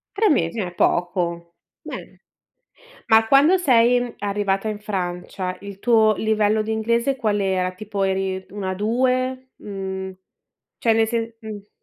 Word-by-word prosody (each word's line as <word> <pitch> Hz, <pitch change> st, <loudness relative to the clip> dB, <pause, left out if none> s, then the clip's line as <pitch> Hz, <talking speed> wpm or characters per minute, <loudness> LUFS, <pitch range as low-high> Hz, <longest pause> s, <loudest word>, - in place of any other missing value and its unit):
3 430 Hz, +1 st, +3 dB
mesi, 215 Hz, -, +1 dB
eh, 180 Hz, -3 st, -3 dB
poco. 170 Hz, -1 st, -1 dB, 0.3 s
Bene. -, -, -9 dB, 0.9 s
Ma 225 Hz, 0 st, +5 dB
quando 295 Hz, +9 st, +5 dB
sei 245 Hz, -5 st, +3 dB
arrivata 200 Hz, 0 st, -1 dB
in 210 Hz, -1 st, -3 dB
Francia 185 Hz, -2 st, -4 dB
il 200 Hz, -1 st, -9 dB
tuo 220 Hz, -3 st, +4 dB
livello 215 Hz, 0 st, +1 dB
di 220 Hz, -, -5 dB
inglese 235 Hz, +4 st, +1 dB
qual 210 Hz, -5 st, 0 dB
era? 185 Hz, -1 st, 0 dB
Tipo 200 Hz, +1 st, -4 dB
eri 190 Hz, 0 st, -1 dB
un 205 Hz, 0 st, -7 dB
A2? 255 Hz, +6 st, 0 dB
Mhmm, 190 Hz, -2 st, -6 dB, 0.6 s
cioè 225 Hz, -1 st, +2 dB
nel 225 Hz, 0 st, +3 dB
se 230 Hz, -1 st, -3 dB
mh. 210 Hz, -2 st, -9 dB
210 Hz, 135 wpm, -22 LUFS, 190-230 Hz, 0.9 s, Ma